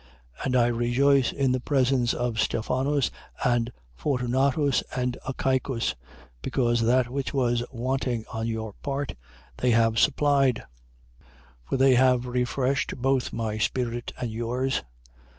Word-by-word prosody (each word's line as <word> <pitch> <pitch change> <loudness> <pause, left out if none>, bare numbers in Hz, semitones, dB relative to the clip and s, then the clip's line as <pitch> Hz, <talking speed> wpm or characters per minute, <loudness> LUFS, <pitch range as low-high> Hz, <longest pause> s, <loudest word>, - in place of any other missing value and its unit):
16:17. - - -5
And 130 - 0
I 120 -2 +5
rejoice 120 +3 +2
in 135 -2 +1
the 130 - +1
presence 130 -2 +1
of 120 -3 -2
Stephanus 130 +6 0 0.3
and 120 -1 +1 0.2
Fortunatus 135 - +1
and 125 -1 -1
Achaicus: 130 -2 0 0.5
because 120 - +1
that 120 +2 +3
which 140 +1 -3
was 120 -2 +1
wanting 125 -2 -2
on 110 0 -2
your 110 -2 -4
part, 140 -1 -3 0.4
they 125 - +1
have 115 -1 +3
supplied. 140 -3 +3 0.6
16:18. 65 - -27 0.4
For - - +1
they 135 0 +5
have 125 0 +4
refreshed 125 +2 -1
both 135 0 0
my 110 -2 -3
spirit 120 +2 -1
and 120 -2 -3
yours. 125 +4 -1
125 Hz, 135 wpm, -26 LUFS, 120-135 Hz, 0.6 s, I